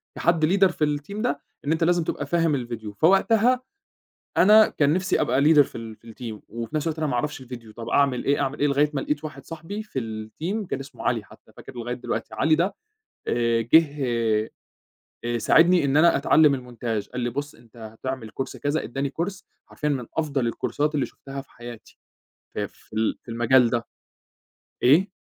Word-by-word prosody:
كحد 165 -2 +2
leader 195 +3 +4
في 150 -3 0
الteam 200 +9 -7
ده 245 - 0 0.3
إن 150 - 0
أنت 165 +1 +1
لازم 175 0 +3
تبقى 145 - -3
فاهم 165 -1 +1
الفيديو، 115 -4 -5
فوقتها 225 - +3 0.8
أنا 215 +2 +7
كان 145 0 +1
نفْسي 185 0 +1
أبقى 130 +3 +2
leader 150 0 +6
في 130 - -2
ال 110 -1 -8
في 115 +1 -14
الteam 110 -4 -8
وفي 115 +6 -6
نفس 155 +2 -1
الوقت 160 - -2
أنا 155 - 0
ما 130 - -2
أعرفش 135 +2 -2
الفيديو 120 -3 -10
طَب 115 0 -7
أعمل 140 -3 +2
إيه! 140 - +2
أعمل 135 +2 -2
إيه! 145 - +3
لغاية 145 +1 +2
ما 135 - -1
لاقيت 150 +1 -2
واحد 140 -3 -8
صاحبي 165 +7 -6
في 140 -11 -4
الteam 120 - -4
كان 135 - -3
اسمه 135 - -10
علي - - 0
حتّى. - - -19
فاكره - - -11
لغاية 120 0 -4
دلوقتي، 125 - -4
علي 155 0 +3
ده 175 +5 0 0.5
آآ، 115 -1 +1
جِه 150 +5 +4 1.3
آآ، 120 0 -1
ساعدني 170 +6 +5
إن 140 +1 +1
أنا 170 0 +5
أتعلّم 145 0 +4
الmontage 120 -4 -4
قال 125 - -3
لي: 120 0 -1
"بُص 145 +4 -5
أنت 115 0 -21
هتعمل 115 +1 -6
Course 130 - -3
كذا" 145 +2 -1
ادّاني 135 +3 -2
Course 185 0 -5 0.2
حرفيًا 150 - -3
من 130 -5 -2
أفضل 140 -6 0
الكورسات 150 +6 -1
اللي 140 -3 +1
شُفتها 135 0 -9
في 135 - -15
حياتي، 120 -1 -11 0.6
في - - -2
في - - -24
ال 110 0 0
في 115 - -10
المجال 120 +1 +4
ده، 120 -1 -1 1.0
إيه؟ 175 - +5
140 Hz, 190 wpm, -24 LUFS, 120-160 Hz, 1.3 s, أنا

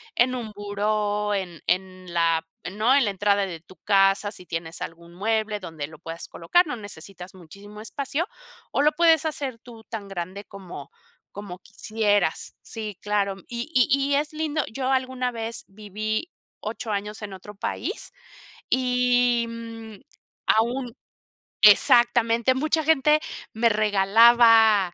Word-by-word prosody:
en 255 +1 +3
un 230 -4 -5
buró, 205 0 -1
en 180 -5 -4
en 185 0 -2
la 165 -1 +1 0.2
¿no? 220 +6 +3
En 280 - +5
la 205 - 0
entrada 200 0 +1
de 170 -3 -7
tu 180 +3 -18
casa, 195 0 +3
si 180 -3 -10
tienes 165 0 -5
algún 170 +1 -8
mueble 215 +2 -1
donde 160 -5 -6
lo 155 -1 -14
puedas 165 +1 -7
colocar, 330 - +2
no 250 -5 -4
necesitas 190 -2 -8
muchísimo 200 +5 -12
espacio 280 +7 -2 0.5
o - - +1
lo 300 +1 +4
puedes 325 -1 +4
hacer 275 -6 -3
tú 230 -2 -14
tan 215 -3 -7
grande 190 +2 -6
como 190 - -10 0.4
como 195 -3 -8
quisieras. 205 -3 -1
Sí, 215 -4 -6
claro. 205 -2 0
Y 240 +3 -4
y 250 - +5 0.3
y - - +4
es 295 +1 0
lindo. 310 -1 -1
Yo 260 +3 -2
alguna 260 -1 0
vez 230 -1 -4
viví 215 - -4 0.3
8 220 +1 -5
años 210 +2 -4
en 205 -2 -6
otro 205 +2 -11
país - - -4 0.6
y, 250 -2 +2
mm, 230 -1 -8 0.5
aún 240 +2 +1 0.7
exactamente. 235 +3 +5
Mucha 310 +3 +1
gente 305 0 +4 0.3
me 230 +1 +3
regalaba 215 -1 +5
215 Hz, 140 wpm, -24 LUFS, 195-245 Hz, 0.7 s, En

